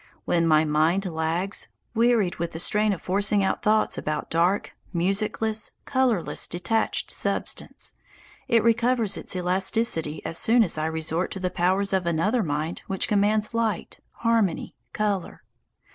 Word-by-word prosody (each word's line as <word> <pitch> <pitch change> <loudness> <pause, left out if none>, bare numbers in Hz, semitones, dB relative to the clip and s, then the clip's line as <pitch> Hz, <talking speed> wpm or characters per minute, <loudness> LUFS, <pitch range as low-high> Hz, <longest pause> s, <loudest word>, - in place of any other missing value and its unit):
When 170 -1 +2
my 155 0 +4
mind 160 +6 +2
lags, 170 +3 -2 0.3
wearied 230 -5 +2
with 170 0 -3
the 160 - -5
strain 210 +4 +2
of 190 - -4
forcing 200 +2 +2
out 190 - 0
thoughts 215 0 +2
about 150 0 -3
dark, 175 +5 +1 0.2
musicless, 210 +4 -1 0.2
colourless, 255 -9 +1
detached 180 +6 0
substance, - - -2 0.5
it 230 -2 +3
recovers 235 -2 +2
its - - -3
elasticity 180 -3 -1
as 165 - -1
soon 230 +1 +5
as 180 - -1
I 155 - 0
resort 160 +2 -1
to 190 - -5
the 180 -1 -2
powers 190 +3 +1
of 185 -2 +1
another 190 +9 +1
mind 155 -1 -2
which 190 -1 -1
commands 210 +1 +2
light, 225 -5 -2 0.3
harmony, 225 -7 +1 0.2
colour. 205 -1 -2
190 Hz, 145 wpm, -25 LUFS, 170-215 Hz, 0.5 s, soon